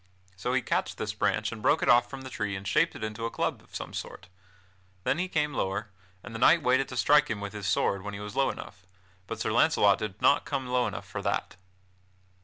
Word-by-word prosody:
So 125 +7 -2
he 130 -1 +1
catched 95 -2 -1
this 105 - -3
branch 105 +1 0
and 110 -2 -7
broke 150 +8 +3
it - - 0
off 120 0 +5
from 135 0 -7
the 130 0 -8
tree 100 -3 -2
and 95 +1 -6
shaped 160 +11 +2
it 110 0 -4
to 115 +1 -4
a - - -4
club - - -2
of - - -17
some - - -6
sort. 90 - -7 0.7
Then 140 - +1
he 185 - 0
came 150 -4 0
lower, 100 0 -2 0.3
and 120 - -9
the 115 - -5
knight 160 +6 +5
waited 130 +1 +3
to 125 - -6
strike 150 +4 +5
him 110 - -2
with 100 0 -6
his 105 -3 -5
sword, 100 0 +1
when 100 +1 -6
he - - -6
was 105 0 -7
low 135 - +3
enough; 100 - -8 0.5
but - - -5
Sir - - -1
Launcelot 100 -1 +4
did 105 -2 -5
not 140 - +4
come 140 -2 -3
low 125 0 +1
enough - - -6
for - - -5
that. - - -2
110 Hz, 240 wpm, -28 LUFS, 100-130 Hz, 0.7 s, off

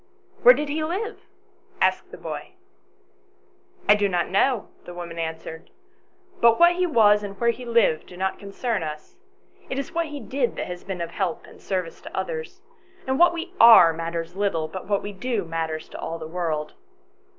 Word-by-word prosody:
" - - -32
Where - - +9
did 300 - -2
he 305 +2 -2
live? 395 +8 -3 0.3
" - - -33
asked - - +1
the - - -10
boy. - - -7 0.7
" 370 0 -33
I - - +8
do 205 -1 +1
not 175 -2 -1
know," 230 +4 +2 0.2
the 175 - -9
woman 170 -1 -7
answered, 160 0 -6 0.4
" 375 0 -32
but 230 -1 +5
what 345 0 +7
he 365 0 +2
was 210 -8 +5
and 200 -1 -7
where 235 0 +3
he 250 +2 -9
lived 230 -9 +2
do 180 - -12
not 190 +1 -2
concern 205 +1 -3
us; 155 -1 -7 0.5
it 265 - -3
is 275 - -4
what 335 -1 0
he 295 -1 -7
did 250 0 -2
that - - -3
has 180 0 -7
been 185 -2 -5
of 170 0 -4
help 185 -4 -3
and - - -16
service 185 -4 -3
to - - -9
others; 470 -1 -4 0.4
and 265 0 -1
what 350 0 +7
we 345 +2 -6
are 220 -8 +9
matters 165 +1 -4
little, 195 -6 0
but 190 +3 -8
what 200 -1 0
we 205 - -6
do 215 -1 -2
matters 160 -1 -3
to - - -9
all 165 - -4
the 160 -1 -7
world." 160 -3 -3
200 Hz, 205 wpm, -24 LUFS, 170-275 Hz, 0.7 s, Where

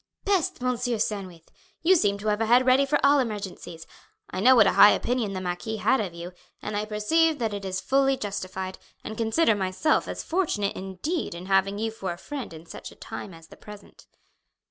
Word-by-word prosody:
"Peste, 390 -5 0
Monsieur 245 -1 -1
Sandwith! 190 -6 -4 0.3
You 370 +3 +5
seem 205 - +2
to 210 +1 -2
have 210 +1 0
a 225 - +1
head 245 +3 +5
ready 260 +2 +4
for 295 - +2
all 285 +1 +5
emergencies. 200 -8 -5 0.5
I 185 - -4
know 255 +6 +6
what 225 -4 +7
a 195 - +4
high 205 - +8
opinion 235 -5 -1
the 185 - -4
marquis 185 +5 -4
had 260 - +2
of 195 -4 -4
you, 170 +1 -7 0.3
and 210 - -5
I 210 +1 -1
perceive 305 +10 +1
that 225 -5 -2
it 200 -1 -5
is 185 -1 -3
fully 270 +2 +2
justified, 190 -3 -5 0.2
and 220 - -6
consider 225 +4 +2
myself 195 +9 0
as - - -5
fortunate 315 - -1
indeed 190 - -4
in 175 +1 -8
having 195 +1 +2
you 220 +1 -2
for 195 -4 -5
a - - -11
friend 275 +6 -7
in 160 0 -11
such - - -9
a - - -15
time 200 - -8
as 165 -1 -15
the - - -14
present." 210 -1 -14
210 Hz, 210 wpm, -26 LUFS, 190-255 Hz, 0.5 s, high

